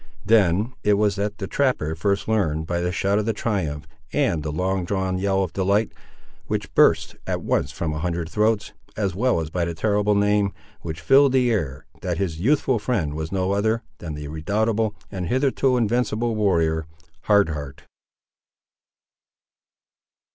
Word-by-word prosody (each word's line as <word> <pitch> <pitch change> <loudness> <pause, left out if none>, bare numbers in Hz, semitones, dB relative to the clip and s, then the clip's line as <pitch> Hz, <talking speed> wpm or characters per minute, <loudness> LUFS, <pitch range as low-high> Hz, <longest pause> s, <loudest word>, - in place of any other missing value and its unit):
Then 105 +2 +3
it 105 0 +4
was 105 -1 +2
that 105 +1 -2
the 100 - -4
trapper 125 - 0
first 100 +5 -1
learned, 80 -8 0
by 85 +1 -1
the 90 0 0
shout 100 +2 +1
of 110 +1 0
triumph 80 -10 -2 0.3
and 80 - +1
the 75 0 -3
long 95 +4 -1
drawn 95 0 -1
yell 95 0 +1
of 85 -4 -5
delight, 100 +3 +1 0.6
which - - -3
burst - - +3
at - - -2
once - - 0
from 80 -2 -3
a 80 - -3
hundred 85 -1 -2
throats, 110 +3 0 0.2
as 100 -4 0
well 120 +1 +1
as 80 -1 -6
by 90 0 -1
the 85 0 -3
terrible 105 +2 +1
name, 105 0 +2 0.3
which 80 -2 -6
filled 135 - +5
the 125 -2 +3
air, 70 - -2 0.2
that - - -2
his 85 -5 -2
youthful 130 - +2
friend 105 - -1
was 80 +1 -4
no 95 0 0
other 110 +3 +1 0.2
than 80 -3 -6
that 75 0 -6
redoubtable 105 +7 0 0.2
and 95 -3 -4
hitherto 130 +2 +2
invincible 120 0 0
warrior, 80 -6 +1 0.4
Hard 100 -4 +4
Heart. 70 -3 -6
100 Hz, 160 wpm, -23 LUFS, 85-110 Hz, 0.6 s, filled